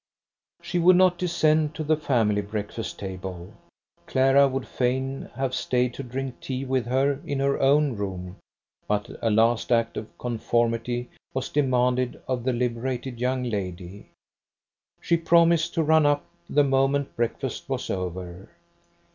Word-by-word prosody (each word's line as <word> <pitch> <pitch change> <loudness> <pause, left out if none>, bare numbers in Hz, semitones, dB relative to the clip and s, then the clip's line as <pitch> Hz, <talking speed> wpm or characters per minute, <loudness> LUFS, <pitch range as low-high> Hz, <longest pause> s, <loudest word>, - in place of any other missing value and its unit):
She 175 - -1
would 180 +2 +6
not 180 -1 +4
descend 155 -3 +2
to 155 - -3
the 155 +1 +2
family 115 -9 +1
breakfast 105 +2 -5
table. 95 -2 -7 0.5
Clara 135 +1 +4
would 135 -1 -3
fain 130 +2 -2
have 135 -1 -2
stayed 125 -1 0
to - - -6
drink 130 0 -5
tea 130 0 -4
with 130 -3 -1
her 135 +3 +1
in 140 - -3
her 140 0 +1
own 140 -1 +3
room, 95 -2 -5 0.5
but 105 0 -1
a 115 - +1
last 115 +3 +2
act 115 -1 +2
of 110 0 -7
conformity 120 0 -1 0.2
was 130 0 -2
demanded 125 -3 +1
of 125 -2 -2
the 130 - +2
liberated 125 +1 -2
young 125 +1 0
lady. 95 -4 -5 0.9
She 170 - +1
promised 170 -1 +3
to 165 - +2
run 155 -1 +4
up 145 0 +1 0.2
the 145 - +4
moment 135 +1 +1
breakfast 120 -1 -3
was - - -2
over. 90 0 -5
125 Hz, 145 wpm, -25 LUFS, 115-140 Hz, 0.9 s, would